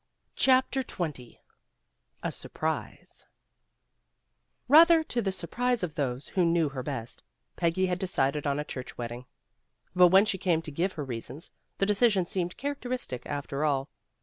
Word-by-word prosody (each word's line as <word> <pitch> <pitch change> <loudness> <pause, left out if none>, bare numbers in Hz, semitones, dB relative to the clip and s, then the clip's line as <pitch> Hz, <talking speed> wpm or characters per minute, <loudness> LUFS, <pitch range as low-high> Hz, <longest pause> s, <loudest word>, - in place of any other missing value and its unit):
CHAPTER 260 0 +3
XX 150 - -5 0.9
A - - -1
SURPRISE - - -5 1.4
BATHER 325 +4 +7
to 245 -6 -2
the 195 -3 -1
surprise 240 +6 -1
of 165 -4 -2
those 135 -3 -3
who 185 - +1
knew 165 -2 +2
her 135 -2 -5
best, 125 -4 -5 0.3
Peggy 175 +2 +1
had 180 -1 -1
decided 150 -6 0
on 140 0 +1
a - - -1
church 130 -3 -7
wedding. 120 +1 -6 0.7
But 180 0 +8
when 190 +4 +6
she 190 -3 -1
came 165 -3 +1
to 155 - -5
give 180 +6 -1
her 150 - -4
reasons, 130 +4 -7 0.3
the 195 - +2
decision 205 -2 +3
seemed 175 0 -2
characteristic, 255 - -4
after 145 0 -3
all. 140 -2 0
170 Hz, 150 wpm, -28 LUFS, 140-205 Hz, 1.4 s, But